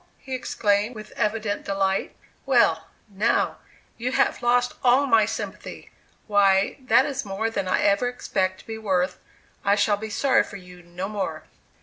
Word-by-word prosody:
he 265 - -9
exclaimed, 215 -2 0
with 215 -1 -10
evident 210 -1 -2
delight; 195 -1 -1 0.3
"well, - - +3 0.2
now, 215 +3 0 0.4
you 250 +3 -2
have - - +1
lost 245 0 +2
all 255 +3 +5
my 225 -5 +4
sympathy; 220 - -7 0.3
why, 200 -2 +3
that 255 0 +3
is 275 -2 -3
more 210 +2 -2
than 195 -4 -2
I 185 - +1
ever 200 +4 +3
expect 185 -6 -2
to - - -24
be 220 -1 -6
worth; 185 -3 0 0.4
I 200 0 +3
shall 205 0 +2
be 220 +1 -6
sorry 265 +5 +3
for 200 - -9
you 180 -1 -14
no 175 +2 -6
more." 205 -1 -4
210 Hz, 160 wpm, -24 LUFS, 195-240 Hz, 0.4 s, all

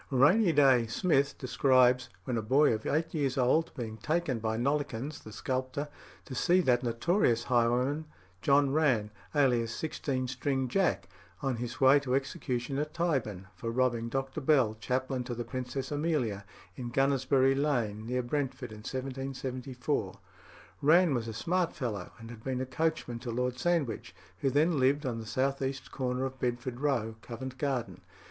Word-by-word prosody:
"Rainy 155 - +5
Day" 135 -6 +5
Smith 140 - +1
describes, 130 -1 +3
when 125 - -2
a 115 - 0
boy 130 +5 +4
of 110 0 -3
eight 160 +2 0
years 140 -4 0
old, 130 +6 +2
being 115 -4 -5
taken 145 +2 -1
by 110 0 -1
Nollekens, 140 +1 -2
the 110 - -10
sculptor, 130 +5 -3 0.4
to - - -8
see 175 +8 +3
that 125 -6 +3
notorious 120 - +1
highwayman 125 +5 +1 0.4
John 140 -1 +4
Rann, 125 -9 +2 0.2
alias 120 -5 +3
"Sixteen 140 -4 -2
string 130 0 -1
Jack," 190 +6 +1 0.4
on 135 -3 0
his 120 +3 -5
way 135 +1 +7
to 130 -2 -1
execution 135 0 -2
at 150 +1 -3
Tyburn, 130 - -1
for 115 +6 -4
robbing 120 -1 0
Dr. 135 +1 -3
Bell, 130 -6 +3
chaplain 130 +2 -1
to 120 - -4
the 120 0 -4
Princess 130 +1 -4
Amelia, 145 -10 -1 0.3
in 120 -2 -5
Gunnersbury 135 +1 +3
Lane, 120 -7 -1
near 125 +1 -1
Brentford, 130 -2 -3
in 105 - -9
1774. 130 -2 -4 0.6
Rann 165 +2 +5
was 115 -3 -1
a - - -3
smart 175 +9 0
fellow, 105 -9 -4
and 115 0 -10
had 110 -2 -11
been 130 -1 -2
a 130 - -1
coachman 155 -4 -2
to 125 0 -6
Lord 125 +1 -1
Sandwich, 160 -8 -1 0.2
who 135 - +1
then 150 +3 +2
lived 140 +3 +2
at 120 -3 -2
the 110 - -8
south 135 +5 0
east 135 0 -3
corner 130 0 -1
of 130 0 -6
Bedford 120 0 -2
Row, 120 -6 0
Covent 130 +2 -7
Garden. 135 -5 -2
130 Hz, 165 wpm, -30 LUFS, 120-140 Hz, 0.6 s, way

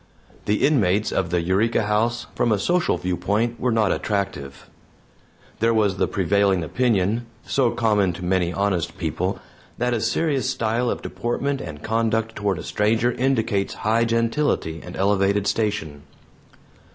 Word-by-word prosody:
The 105 - +2
inmates 105 -8 +2
of 90 -3 0
the 85 0 +1
Eureka 105 +6 +1
House, 110 +3 0
from 120 - +1
a 105 - +3
social 175 - +1
viewpoint, 105 +6 -1
were 125 - +1
not 110 -3 +2
attractive. 70 -10 -3 0.9
There 115 +1 +2
was 100 -4 +2
the - - +1
prevailing 100 -1 +1
opinion 115 - 0 0.2
so 130 -3 +2
common 105 -5 +2
to 90 +1 -7
many 90 -1 +1
honest 90 -2 -1
people 90 +2 -2 0.4
that 125 +1 0
a 115 - -1
serious 140 -4 0
style 120 -1 0
of - - -3
deportment 135 +4 -2
and 75 - -8
conduct 115 0 0
toward 100 -3 -1
a - - -6
stranger 110 +3 +1
indicates 115 -6 0
high 115 +2 +3
gentility 115 - 0
and 90 - -9
elevated 100 +1 +2
station. 100 -10 -1
105 Hz, 145 wpm, -23 LUFS, 95-115 Hz, 0.9 s, a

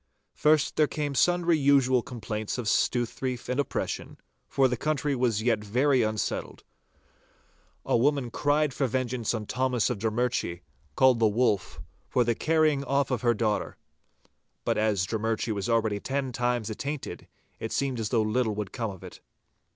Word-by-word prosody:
First 150 -1 +2
there 155 - +4
came 145 -1 -3
sundry 175 +2 +3
usual 135 -3 +4
complaints 110 -3 -5
of 125 - -4
stouthreif 120 +3 0
and 125 +2 -1
oppression, 145 - -3 0.3
for 135 -1 +3
the 125 - -1
country 145 +2 -1
was 120 -4 0
yet 115 -3 +1
very 130 +5 +2
unsettled. 110 -2 -2 1.2
A - - +1
woman 135 0 +1
cried 145 +1 +1
for 135 0 0
vengeance 125 -2 -1
on 110 -1 -4
Thomas 125 0 0
of 115 - -3
Drummurchie, 110 -5 -1 0.3
called 130 -3 +5
the 110 - +4
Wolf, 105 -6 0 0.3
for 125 - +2
the 120 0 +1
carrying 155 +1 +2
off 140 0 0
of 125 - 0
her 120 -2 +2
daughter. 105 -1 -1 0.9
But - - +1
as 105 -4 +1
Drummurchie 110 +1 -1
was 100 +3 -3
already 110 -3 +1
ten 135 +3 -2
times 120 -3 -1
attainted, 140 +6 -5 0.3
it 110 - -5
seemed 135 -3 -1
as 110 -2 -2
though 115 -1 +2
little 110 0 0
would 105 -2 -4
come 115 -2 -3
of 95 -3 -10
it. - - -11
125 Hz, 160 wpm, -27 LUFS, 110-135 Hz, 1.2 s, called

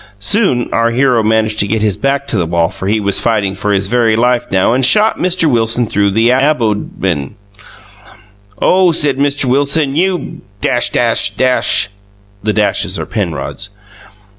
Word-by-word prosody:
Soon 125 - +1
our 115 0 +1
hero 125 -1 +1
manged 110 0 0
to 100 - +2
get 110 +1 -1
his 105 -3 0
back 135 +5 -1
to 130 - -4
the 85 - -1
wall 85 0 0
for 95 - -7
he 110 +2 +1
was 100 -1 +1
fighting 105 -4 -1
for 105 +1 -3
his 95 -1 +1
very 115 +1 +1
life 120 +1 0
now 95 +4 +1
and 130 +1 0
shot 215 - +3
Mr 180 -1 0
Wilson 115 -2 +1
through 105 -2 0
the 115 +4 +2
abodmen 105 - -1 1.2
Oh 185 -1 +3
said 145 -4 +2
Mr 140 0 0
Wilson 140 +2 0
you 180 +2 -2 0.2
(The 100 -4 0
dashes 105 -1 -1
are - - -4
Penrod's.) 100 +1 -5
115 Hz, 150 wpm, -13 LUFS, 100-135 Hz, 1.2 s, shot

